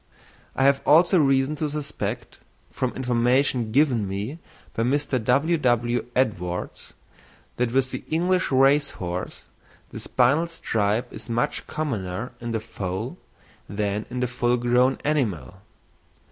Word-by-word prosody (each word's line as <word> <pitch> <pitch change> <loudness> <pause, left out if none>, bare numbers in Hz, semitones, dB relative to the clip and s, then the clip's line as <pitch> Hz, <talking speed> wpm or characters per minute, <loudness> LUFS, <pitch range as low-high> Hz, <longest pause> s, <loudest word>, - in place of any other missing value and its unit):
I 135 - +1
have 140 0 +4
also 170 +4 +5
reason 135 0 +2
to 150 0 -1
suspect, 150 -1 -5 0.3
from 130 -1 -1
information 125 -1 +1
given 125 -6 +2
me 105 - -4 0.3
by - - -2
Mr. 130 0 0
W.W. 125 -3 +2
Edwards, 90 -8 -2 0.6
that 120 -1 0
with 130 0 +1
the 130 - -5
English 180 +3 +1
race 140 +2 +4
horse 90 0 -5 0.5
the - - -7
spinal 140 +7 +2
stripe 115 -7 -1
is - - -9
much 120 +1 -1
commoner 115 -8 -3
in 120 0 -4
the 110 - -1
foal 110 - -5 0.5
than 105 +1 -2
in 125 0 -4
the 125 - +1
full 125 0 +1
grown 125 +2 +3
animal. 105 - -1
125 Hz, 130 wpm, -24 LUFS, 110-140 Hz, 0.6 s, also